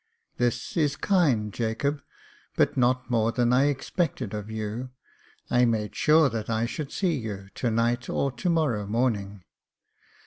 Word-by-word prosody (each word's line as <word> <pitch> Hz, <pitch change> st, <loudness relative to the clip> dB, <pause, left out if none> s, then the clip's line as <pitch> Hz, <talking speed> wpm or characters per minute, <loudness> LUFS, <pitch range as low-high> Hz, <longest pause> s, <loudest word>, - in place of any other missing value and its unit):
" -, -, -47 dB
This 120 Hz, 0 st, -1 dB
is 150 Hz, -3 st, +2 dB
kind, 135 Hz, -, +2 dB
Jacob, 125 Hz, +6 st, -1 dB, 0.5 s
but -, -, +2 dB
not 125 Hz, 0 st, +1 dB
more 115 Hz, -1 st, +2 dB
than 120 Hz, 0 st, +2 dB
I 130 Hz, +3 st, +4 dB
expected 140 Hz, -, -1 dB
of 105 Hz, 0 st, -5 dB
you— 110 Hz, +3 st, -4 dB, 0.6 s
^I 125 Hz, 0 st, +4 dB
made 105 Hz, -2 st, -2 dB
sure 155 Hz, 0 st, +5 dB
that 115 Hz, -3 st, -4 dB
I 115 Hz, 0 st, +1 dB
should 140 Hz, +4 st, -5 dB
see 185 Hz, -4 st, 0 dB
you 100 Hz, -4 st, -6 dB
to 125 Hz, -, -1 dB
night 120 Hz, +2 st, 0 dB
or 140 Hz, -, 0 dB
to 175 Hz, +8 st, -2 dB
morrow 140 Hz, -12 st, +1 dB
morning. 105 Hz, -4 st, -1 dB
120 Hz, 160 wpm, -26 LUFS, 110-140 Hz, 0.6 s, sure